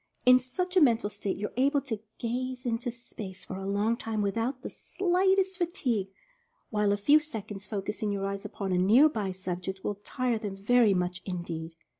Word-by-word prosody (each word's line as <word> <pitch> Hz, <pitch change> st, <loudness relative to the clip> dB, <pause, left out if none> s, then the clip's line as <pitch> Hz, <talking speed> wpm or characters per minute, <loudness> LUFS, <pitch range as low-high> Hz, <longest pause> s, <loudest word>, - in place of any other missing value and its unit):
In 255 Hz, 0 st, +8 dB
such 360 Hz, +9 st, -3 dB
a 370 Hz, -, +6 dB
mental 230 Hz, -6 st, +4 dB
state 205 Hz, -2 st, -3 dB
you 210 Hz, -, -3 dB
are -, -, -24 dB
able 280 Hz, +3 st, +3 dB
to 235 Hz, -6 st, -4 dB, 0.2 s
"gaze 255 Hz, +2 st, -3 dB
into 240 Hz, +1 st, -1 dB
space" 215 Hz, -5 st, -8 dB
for 185 Hz, -, -6 dB
a 195 Hz, 0 st, -5 dB
long 205 Hz, +3 st, +1 dB
time 220 Hz, -2 st, -2 dB
without 230 Hz, +6 st, -1 dB
the -, -, -4 dB
slight 380 Hz, +1 st, +1 dB
est 380 Hz, -1 st, 0 dB
fatigue, 260 Hz, -, 0 dB, 0.6 s
while 210 Hz, -2 st, +2 dB
a 205 Hz, -, +2 dB
few 285 Hz, +9 st, +5 dB
seconds' 215 Hz, -9 st, -7 dB
focusing 210 Hz, +1 st, -2 dB
your 195 Hz, -1 st, -2 dB
eyes 200 Hz, 0 st, -3 dB
upon 195 Hz, -2 st, -4 dB
a 180 Hz, -, +2 dB
near 225 Hz, +11 st, +7 dB
by 210 Hz, -9 st, -2 dB
object 185 Hz, +1 st, -4 dB
will 205 Hz, -1 st, -3 dB
tire 250 Hz, -3 st, -1 dB
them 205 Hz, -3 st, -4 dB
very 215 Hz, 0 st, +4 dB
much 180 Hz, 0 st, -1 dB
in 180 Hz, -3 st, -4 dB
deed. 165 Hz, -1 st, -6 dB
220 Hz, 200 wpm, -29 LUFS, 195-255 Hz, 0.6 s, In